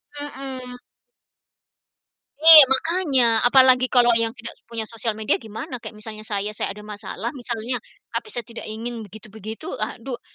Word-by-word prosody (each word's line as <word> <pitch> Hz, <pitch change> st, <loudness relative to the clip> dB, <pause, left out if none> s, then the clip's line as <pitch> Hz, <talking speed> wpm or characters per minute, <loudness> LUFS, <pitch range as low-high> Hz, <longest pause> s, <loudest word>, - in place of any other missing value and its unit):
Mhm. 265 Hz, -3 st, -4 dB, 1.7 s
Iya, 320 Hz, -2 st, +12 dB
makanya, 285 Hz, 0 st, +2 dB, 0.2 s
apalagi 255 Hz, 0 st, +5 dB
kalau 245 Hz, -1 st, +3 dB
yang 230 Hz, 0 st, +1 dB
tidak 235 Hz, -2 st, -7 dB, 0.2 s
punya 230 Hz, -1 st, -4 dB
sosial 225 Hz, 0 st, -4 dB
media 215 Hz, -2 st, -1 dB
gimana? 225 Hz, +3 st, -8 dB
Kayak 230 Hz, -, -10 dB
misalnya 215 Hz, -1 st, -8 dB
saya, 205 Hz, 0 st, -2 dB
saya 215 Hz, -, -4 dB
ada 210 Hz, -, -12 dB
masalah 210 Hz, +2 st, -7 dB
misalnya, 245 Hz, -2 st, -4 dB, 0.3 s
tapi -, -, -5 dB
saya 240 Hz, -, -5 dB
tidak 230 Hz, +2 st, -10 dB
ingin 230 Hz, +2 st, -6 dB
begitu-begitu, 220 Hz, +1 st, -10 dB
aduh, 235 Hz, +3 st, -5 dB
235 Hz, 140 wpm, -22 LUFS, 220-255 Hz, 1.7 s, Iya